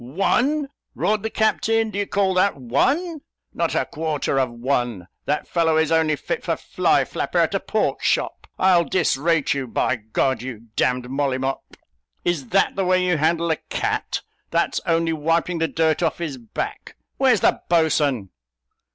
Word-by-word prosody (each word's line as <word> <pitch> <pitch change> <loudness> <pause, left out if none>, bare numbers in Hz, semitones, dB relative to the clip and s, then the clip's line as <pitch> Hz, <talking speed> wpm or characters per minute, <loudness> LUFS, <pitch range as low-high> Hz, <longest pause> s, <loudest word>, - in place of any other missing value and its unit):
"One!" 245 - +1 0.3
roared 215 0 +1
the 220 - -2
captain; 220 0 +1
"do 200 - -3
you 200 - -1
call 195 -2 +1
that 185 -2 +2
one? 280 - 0 0.3
not - - -1
a - - +1
quarter 155 -3 -1
of 130 -2 +1
a - - -13
one. 120 -6 -2 0.2
That 150 +1 -1
fellow 165 -2 +2
is 160 0 +2
only 160 -1 +3
fit - - -4
for - - 0
fly - - +1
flapper - - -3
at - - +3
a - - +1
pork - - -1
shop! - - 0
I'll 185 -2 +4
disrate 165 -3 +1
you, 135 -2 -3
by 130 +2 0
G 110 - -24
d, 130 -2 +1
you 120 -5 -6 0.2
d 125 0 +1
d 125 - -11
Molly 135 0 0
Mop; 135 +1 -4 0.5
is 165 -7 -1
that 195 +7 +2
the 195 - 0
way 185 0 +2
you 180 -2 +2
handle 165 +2 +1
a 160 - +1
cat; - - -2 0.3
that's - - 0
only 165 0 +2
wiping 165 +2 0
the 165 - +1
dirt 160 0 +1
off 165 -3 0
his 155 -6 -4
back. 115 -2 -6 0.2
Where's 255 -6 +3
the - - +2
boatswain?" 150 - +2
160 Hz, 180 wpm, -22 LUFS, 135-185 Hz, 0.5 s, I'll